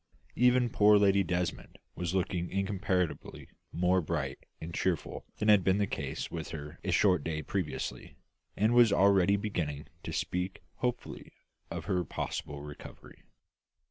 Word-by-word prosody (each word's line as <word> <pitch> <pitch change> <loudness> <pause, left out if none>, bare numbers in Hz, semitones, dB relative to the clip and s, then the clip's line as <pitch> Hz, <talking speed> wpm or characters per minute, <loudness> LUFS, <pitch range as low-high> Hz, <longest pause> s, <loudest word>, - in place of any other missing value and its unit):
Even 125 0 +4
poor 105 0 +6
Lady 100 -1 +4
Desmond 90 -1 -3 0.2
was 90 +1 -3
looking 90 -2 -1
incomparably 95 -3 -2 0.2
more 90 +2 +2
bright 75 -5 -3 0.2
and 85 +1 -7
cheerful 90 -1 -2
than 105 - -1
had 105 -3 +6
been 95 +2 +3
the 105 - +2
case - - -4
with 80 -2 -4
her 75 +1 -8
a 95 - -3
short 90 -2 +3
day 75 -1 -3
previously, 90 +2 -4 0.4
and 110 +3 +3
was 120 -3 +6
already 100 0 +4
beginning 85 -8 -3 0.2
to - - -6
speak 90 +1 -3
hopefully 125 -1 -4 0.4
of - - -5
her 90 -3 0
possible 70 -2 -5
recovery. 75 -1 -11
90 Hz, 140 wpm, -31 LUFS, 85-100 Hz, 0.4 s, poor